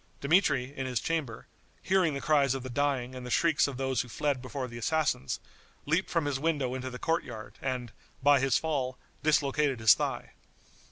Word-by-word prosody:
Dmitri, 140 Hz, -4 st, +2 dB
in 130 Hz, -1 st, -3 dB
his 125 Hz, -2 st, 0 dB
chamber, 150 Hz, -9 st, -3 dB, 0.4 s
hearing 185 Hz, -6 st, +2 dB
the 140 Hz, -, -4 dB
cries 140 Hz, -4 st, +3 dB
of 135 Hz, -, -5 dB
the 130 Hz, -, -6 dB
dying 130 Hz, -2 st, 0 dB
and 130 Hz, -1 st, -7 dB
the 125 Hz, -, -6 dB
shrieks 160 Hz, +4 st, +3 dB
of 140 Hz, -3 st, -5 dB
those 130 Hz, -1 st, 0 dB
who 125 Hz, -, -8 dB
fled 145 Hz, +1 st, -1 dB
before 130 Hz, 0 st, -4 dB
the 120 Hz, -1 st, -8 dB
assassins, 150 Hz, -, 0 dB, 0.5 s
leaped 165 Hz, +6 st, +1 dB
from 165 Hz, -3 st, 0 dB
his 140 Hz, -2 st, -1 dB
window 145 Hz, -5 st, 0 dB
into 130 Hz, 0 st, -4 dB
the 125 Hz, -, -7 dB
court 165 Hz, +5 st, 0 dB
yard, 110 Hz, -3 st, -9 dB
and, 125 Hz, -3 st, -3 dB, 0.3 s
by 145 Hz, 0 st, +6 dB
his 135 Hz, 0 st, +3 dB
fall, 135 Hz, -5 st, -2 dB, 0.2 s
dislocated 145 Hz, -3 st, +2 dB
his 110 Hz, -2 st, +8 dB
thigh. -, -, -3 dB
135 Hz, 190 wpm, -29 LUFS, 125-150 Hz, 0.5 s, his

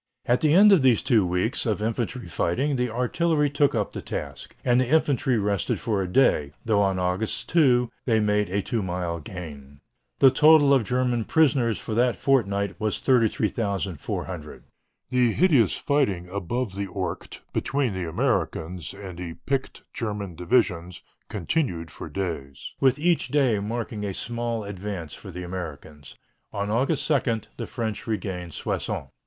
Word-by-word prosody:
At 120 Hz, +1 st, +2 dB
the 155 Hz, -, +3 dB
end 205 Hz, +3 st, +8 dB
of 190 Hz, -6 st, +6 dB
these 130 Hz, -4 st, +4 dB
two 115 Hz, -6 st, +4 dB
weeks 90 Hz, +8 st, 0 dB
of 110 Hz, -2 st, 0 dB
infantry 115 Hz, +1 st, -2 dB
fighting 130 Hz, -, 0 dB
the 125 Hz, -1 st, 0 dB
artillery 145 Hz, +6 st, +1 dB
took 145 Hz, 0 st, +2 dB
up -, -, -1 dB
the -, -, -5 dB
task, -, -, -6 dB
and 125 Hz, 0 st, +4 dB
the 130 Hz, -, 0 dB
infantry 135 Hz, -4 st, +2 dB
rested 100 Hz, -1 st, 0 dB
for 105 Hz, -4 st, -1 dB
a 95 Hz, -, -2 dB
day, 75 Hz, -, +2 dB
though 105 Hz, -2 st, +3 dB
on 95 Hz, -2 st, +1 dB
August 90 Hz, +4 st, -1 dB
2 125 Hz, -7 st, +3 dB
they 115 Hz, -3 st, +3 dB
made 105 Hz, -1 st, +1 dB
a 100 Hz, +2 st, -1 dB
two 115 Hz, -, -1 dB
mile 90 Hz, -2 st, -3 dB
gain. 75 Hz, -4 st, -9 dB, 0.4 s
The 135 Hz, -2 st, +7 dB
total 150 Hz, 0 st, +6 dB
of 130 Hz, -5 st, +3 dB
German 125 Hz, -1 st, 0 dB
prisoners 135 Hz, -8 st, +3 dB
for 110 Hz, -, -5 dB
that 120 Hz, +1 st, +2 dB
fortnight 100 Hz, -8 st, +1 dB
was 110 Hz, -1 st, -1 dB
33,400. 105 Hz, -, -1 dB, 0.5 s
The 125 Hz, -3 st, +3 dB
hideous 145 Hz, -, +4 dB
fighting 130 Hz, -, 0 dB
above 100 Hz, +4 st, -3 dB
the 100 Hz, +1 st, -3 dB
Ourcq 90 Hz, -2 st, -5 dB
between 135 Hz, -5 st, 0 dB
the 90 Hz, -3 st, -3 dB
Americans 80 Hz, +2 st, -2 dB
and 95 Hz, -3 st, -9 dB
the 85 Hz, -2 st, -6 dB
picked 135 Hz, -1 st, -2 dB
German 105 Hz, -5 st, -4 dB
divisions 90 Hz, -1 st, 0 dB, 0.3 s
continued 90 Hz, -, -2 dB
for -, -, -8 dB
days, 80 Hz, -8 st, -5 dB
with 135 Hz, 0 st, +3 dB
each 170 Hz, +2 st, +1 dB
day 135 Hz, -8 st, +2 dB
marking 110 Hz, 0 st, -4 dB
a 100 Hz, -2 st, -3 dB
small 120 Hz, -1 st, -3 dB
advance 100 Hz, -5 st, -6 dB
for 100 Hz, -, -10 dB
the 90 Hz, 0 st, -6 dB
Americans. 80 Hz, -7 st, -8 dB, 0.4 s
On 100 Hz, 0 st, -2 dB
August 135 Hz, +6 st, +1 dB
2 130 Hz, -7 st, +1 dB, 0.2 s
the -, -, -5 dB
French 110 Hz, -3 st, -4 dB
regained 90 Hz, -6 st, -4 dB
Soissons. 70 Hz, -, -3 dB
110 Hz, 160 wpm, -25 LUFS, 90-125 Hz, 0.5 s, end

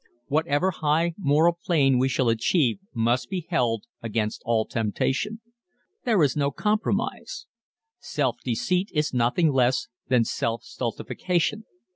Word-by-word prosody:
Whatever 155 Hz, +4 st, +1 dB
high 160 Hz, +1 st, +1 dB
moral 170 Hz, 0 st, +2 dB
plane 135 Hz, -7 st, +3 dB
we 130 Hz, +1 st, +2 dB
shall 130 Hz, -1 st, +1 dB
achieve 120 Hz, +6 st, +2 dB
must 120 Hz, +1 st, 0 dB
be 180 Hz, -4 st, -3 dB
held 115 Hz, -8 st, +1 dB, 0.2 s
against 110 Hz, -1 st, -2 dB
all 115 Hz, -2 st, +2 dB
temptation. 135 Hz, -, -1 dB, 0.6 s
There 215 Hz, -9 st, +3 dB
is 140 Hz, -, +2 dB
no 140 Hz, -1 st, +1 dB
compromise. 210 Hz, +9 st, -2 dB, 0.5 s
Self 130 Hz, -5 st, -1 dB
deceit 180 Hz, -, 0 dB
is 150 Hz, -2 st, 0 dB
nothing 125 Hz, +7 st, +2 dB
less 130 Hz, -1 st, +2 dB, 0.2 s
than 125 Hz, -3 st, +4 dB
self 115 Hz, +1 st, -2 dB
stultification. 180 Hz, -, -2 dB
140 Hz, 125 wpm, -25 LUFS, 120-170 Hz, 0.6 s, than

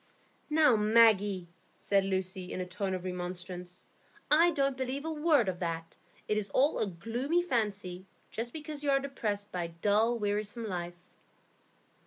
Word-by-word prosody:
"Now, 300 Hz, -5 st, +5 dB
Maggie!" 210 Hz, -4 st, +4 dB, 0.3 s
said 195 Hz, -1 st, +2 dB
Lucy, 185 Hz, -1 st, -2 dB
in -, -, -4 dB
a 185 Hz, -, -2 dB
tone 190 Hz, +1 st, -2 dB
of 180 Hz, -, -6 dB
remonstrance, 180 Hz, 0 st, -5 dB, 0.5 s
"I 330 Hz, +3 st, +6 dB
don't 275 Hz, -4 st, +1 dB
believe 260 Hz, +3 st, -3 dB
a 320 Hz, -, -2 dB
word 300 Hz, -7 st, +3 dB
of 180 Hz, -2 st, -2 dB
that. 165 Hz, -1 st, -4 dB, 0.3 s
It 210 Hz, -, +1 dB
is 200 Hz, -1 st, -5 dB
all 280 Hz, +4 st, +3 dB
a 215 Hz, -, +1 dB
gloomy 240 Hz, -, -1 dB
fancy, 205 Hz, -, -2 dB, 0.2 s
just 235 Hz, +2 st, -3 dB
because 305 Hz, -1 st, -6 dB
you 290 Hz, -, 0 dB
are 275 Hz, 0 st, +4 dB
depressed 210 Hz, -7 st, -3 dB
by 180 Hz, -2 st, -2 dB
a 165 Hz, 0 st, -10 dB
dull, 220 Hz, +3 st, +3 dB
wearisome 210 Hz, +2 st, -2 dB
life." 175 Hz, -2 st, -5 dB
210 Hz, 160 wpm, -31 LUFS, 185-265 Hz, 0.5 s, I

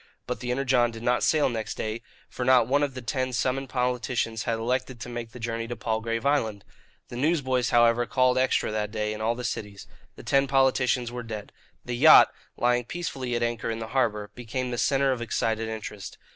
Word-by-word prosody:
But -, -, -4 dB
the 125 Hz, +1 st, -5 dB
Energon 125 Hz, -1 st, +2 dB
did 115 Hz, 0 st, -9 dB
not 120 Hz, 0 st, +2 dB
sail 155 Hz, -2 st, +3 dB
next 110 Hz, -3 st, -3 dB
day, 110 Hz, +1 st, -4 dB, 0.3 s
for 125 Hz, -, -5 dB
not 125 Hz, -2 st, +5 dB
one 140 Hz, +3 st, +2 dB
of 140 Hz, -3 st, -1 dB
the 130 Hz, -, -7 dB
ten 130 Hz, +2 st, -2 dB
summoned 130 Hz, +2 st, -1 dB
politicians 125 Hz, -3 st, -1 dB
had 115 Hz, -, 0 dB
elected 125 Hz, +2 st, -2 dB
to -, -, -6 dB
make 120 Hz, -1 st, -6 dB
the 125 Hz, -, -11 dB
journey 115 Hz, 0 st, -3 dB
to 120 Hz, -, -4 dB
Palgrave 115 Hz, +2 st, -2 dB
Island. 110 Hz, -8 st, +1 dB, 0.5 s
The -, -, -8 dB
newsboys, 130 Hz, -4 st, +1 dB
however, 120 Hz, 0 st, +4 dB
called 130 Hz, -1 st, +3 dB
"Extra" 130 Hz, -3 st, +1 dB
that 105 Hz, -1 st, -2 dB
day 105 Hz, 0 st, -2 dB
in 110 Hz, -, -7 dB
all 115 Hz, +2 st, +1 dB
the 125 Hz, -, -6 dB
cities. 105 Hz, -4 st, -5 dB, 0.3 s
The -, -, -12 dB
ten 135 Hz, 0 st, +2 dB
politicians 130 Hz, -2 st, +2 dB
were 125 Hz, 0 st, -5 dB
dead. 110 Hz, -3 st, -7 dB, 0.3 s
The 120 Hz, -, -3 dB
yacht, 155 Hz, +6 st, +8 dB, 0.2 s
lying 120 Hz, 0 st, +2 dB
peacefully 135 Hz, -6 st, -4 dB
at 120 Hz, -, 0 dB
anchor 120 Hz, -1 st, -2 dB
in 115 Hz, -, -2 dB
the 110 Hz, -1 st, -6 dB
harbour, 105 Hz, -5 st, 0 dB
became 125 Hz, +1 st, -4 dB
the 120 Hz, -, -3 dB
centre 135 Hz, -1 st, +2 dB
of 125 Hz, -2 st, -2 dB
excited 115 Hz, -1 st, -1 dB
interest. 105 Hz, -2 st, -7 dB
120 Hz, 205 wpm, -26 LUFS, 115-130 Hz, 0.5 s, yacht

